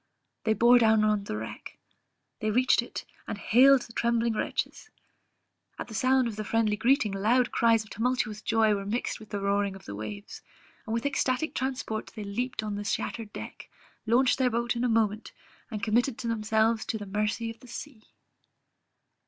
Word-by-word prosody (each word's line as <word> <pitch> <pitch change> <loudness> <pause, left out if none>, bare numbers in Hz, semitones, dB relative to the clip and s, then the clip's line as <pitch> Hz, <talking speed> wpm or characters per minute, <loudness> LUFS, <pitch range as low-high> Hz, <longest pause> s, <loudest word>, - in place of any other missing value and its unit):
They 220 -1 +3
bore 240 +2 +6
down 220 -2 +4
to 210 -1 +2
the 105 - -4
wreck; 110 +1 -8 0.6
they 215 - -1
reached 250 +4 +3
it, - - -7 0.2
and - - -4
hailed 255 +6 +5
the 230 - -13
trembling 235 0 +1
wretches; 215 - -3 0.9
at - - -6
the - - -9
sound 255 +2 +3
of 220 -3 -6
the 215 - -3
friendly 215 0 +1
greeting, 230 -1 +2
loud 225 +6 +2
cries 230 -1 +3
of 215 - -19
tumultuous 225 -2 -1
joy 220 -1 +3
were 200 -1 -2
mixed 230 +4 -2
with 215 - -13
the 205 - -3
roaring 200 0 0
of 195 - -13
the 100 - -7
waves, 105 -1 -7 0.5
and 220 - -1
with 230 - -2
ecstatic 280 +1 0
transport 260 -4 -3
they 215 - -5
leaped 225 +3 -3
on 210 -1 -3
the 205 0 -4
shattered 210 +1 -3
deck, - - -9 0.4
launched 250 +4 +3
their 255 -1 +3
boat 240 +1 -1
in 235 - -1
a 250 - +2
moment, 220 -1 0 0.4
and 215 -4 -6
committed 235 +4 +1
themselves 220 0 +1
to 220 - -1
the 205 - -7
mercy 210 +3 -1
of 225 - -14
the 250 - -15
sea. 240 -1 -8
225 Hz, 185 wpm, -28 LUFS, 210-240 Hz, 0.9 s, bore